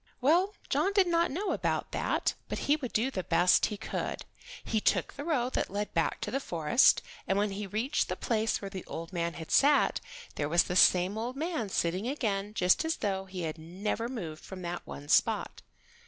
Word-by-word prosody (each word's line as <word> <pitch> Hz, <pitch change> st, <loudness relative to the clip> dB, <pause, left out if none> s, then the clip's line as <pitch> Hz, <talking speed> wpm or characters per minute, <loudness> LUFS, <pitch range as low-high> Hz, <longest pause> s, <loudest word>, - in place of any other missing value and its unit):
Well, 350 Hz, +10 st, +3 dB
John 395 Hz, -, +1 dB
did 395 Hz, -2 st, +5 dB
not 340 Hz, -1 st, +2 dB
know 380 Hz, +9 st, -2 dB
about -, -, -1 dB
that, -, -, 0 dB, 0.2 s
but -, -, -2 dB
he 290 Hz, -, +4 dB
would 265 Hz, -6 st, -5 dB
do 240 Hz, +5 st, +1 dB
the 190 Hz, -, -2 dB
best 175 Hz, +2 st, +4 dB
he 210 Hz, -, -5 dB
could. 220 Hz, -, -4 dB, 0.4 s
He 220 Hz, -2 st, -1 dB
took -, -, +1 dB
the 285 Hz, -, -7 dB
road 260 Hz, -6 st, 0 dB
that -, -, -1 dB
led 205 Hz, +2 st, -3 dB
back 165 Hz, -, 0 dB
to -, -, -3 dB
the 275 Hz, -, 0 dB
forest, 170 Hz, -, +3 dB, 0.2 s
and 195 Hz, -, +1 dB
when 205 Hz, 0 st, +1 dB
he 200 Hz, +1 st, -4 dB
reached 230 Hz, +9 st, -1 dB
the -, -, -1 dB
place 220 Hz, -2 st, -1 dB
where 195 Hz, -, -4 dB
the 190 Hz, -2 st, -6 dB
old 165 Hz, +3 st, -7 dB
man 170 Hz, -1 st, -2 dB
had 160 Hz, -1 st, -8 dB
sat, 285 Hz, +1 st, +4 dB, 0.4 s
there 145 Hz, -1 st, -1 dB
was 170 Hz, +2 st, +5 dB
the 180 Hz, 0 st, +4 dB
old 235 Hz, +4 st, -3 dB
man 310 Hz, -, -2 dB
sitting 185 Hz, +4 st, -1 dB
again 210 Hz, -6 st, -2 dB
just 180 Hz, -, +3 dB
as 320 Hz, +1 st, 0 dB
though 195 Hz, -2 st, -2 dB
he 185 Hz, -2 st, -6 dB
had 160 Hz, 0 st, -4 dB
never 200 Hz, +8 st, -3 dB
moved 170 Hz, -11 st, -6 dB
from 185 Hz, -1 st, -8 dB
that 175 Hz, 0 st, -4 dB
one 145 Hz, -, -8 dB
spot. -, -, +2 dB
210 Hz, 205 wpm, -30 LUFS, 180-270 Hz, 0.4 s, did